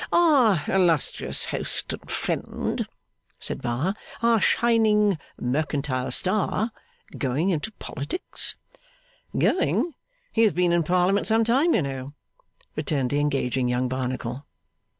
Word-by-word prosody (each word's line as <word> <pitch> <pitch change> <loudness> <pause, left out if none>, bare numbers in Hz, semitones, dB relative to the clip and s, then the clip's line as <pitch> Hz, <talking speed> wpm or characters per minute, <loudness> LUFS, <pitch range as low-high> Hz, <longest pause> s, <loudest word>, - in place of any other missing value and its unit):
'Our 260 - +4
illustrious 175 -6 +2
host - - -1
and - - -9
friend,' - - -2 0.5
said - - -5
Bar; 125 +11 -1 0.3
'our 230 -1 +4
shining 210 -6 +3 0.2
mercantile 135 -1 -1
star; 215 +3 0 0.5
going 145 +7 +1
into 170 +6 -2
politics?' 145 - -3 0.8
'Going? 340 - +2 0.4
He 225 - +2
has 220 -4 +4
been 175 +1 +2
in 170 - +3
Parliament 180 +4 +2
some 225 +1 +3
time, 270 +9 +3
you - - +2
know,' 135 0 -5 0.6
returned 135 -5 -1
the 145 - +1
engaging 135 -3 0
young 125 +1 0
Barnacle. 130 +1 -4
165 Hz, 115 wpm, -25 LUFS, 135-215 Hz, 0.8 s, Our